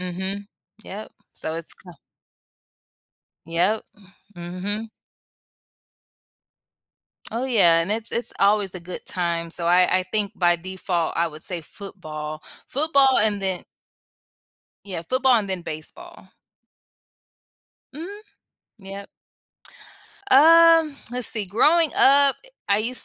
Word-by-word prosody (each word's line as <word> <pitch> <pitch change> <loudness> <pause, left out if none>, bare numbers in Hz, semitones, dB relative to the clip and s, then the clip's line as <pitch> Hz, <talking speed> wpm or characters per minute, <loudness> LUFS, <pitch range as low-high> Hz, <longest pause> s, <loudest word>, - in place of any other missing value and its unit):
mhm. 190 +3 -4 0.4
Yep. 210 +3 -9 0.2
So, 160 - -5
it's 165 0 -4
c 175 -3 -16 1.5
Yep. 180 +6 0 0.5
Mhm. 190 +6 -5 2.4
Oh, 235 +3 -3
yeah 185 -10 +4
and 185 +5 -1
it's 225 +1 -2
it's 235 - -3
always 200 -1 +2
a 185 - -6
good 175 +1 -9
time 170 -2 -2
so, 170 0 -2
I 180 +1 +4
I - - -2
think 200 +1 -2
by 175 -1 +3
default, 180 -1 -3
I 170 - +2
would 155 -1 -8
say 175 -3 +6
football. 155 -4 -8 0.2
Football 275 -2 +2
and 210 -1 +1
then 190 -2 -3 1.2
yeah, 185 -5 -6
football 255 +7 +2
and 210 -3 -1
then 190 -2 -3
baseball. 340 - -6 1.6
Mhm. 370 +9 -9 0.6
Yep. 195 0 -10 1.2
Uh, 330 +3 +7 0.3
let's 245 -1 -3
see 215 -2 -2
growing 305 - +3
up, 280 0 +5 0.3
I 200 0 +3
used 240 +4 -1
195 Hz, 110 wpm, -23 LUFS, 175-245 Hz, 2.4 s, Uh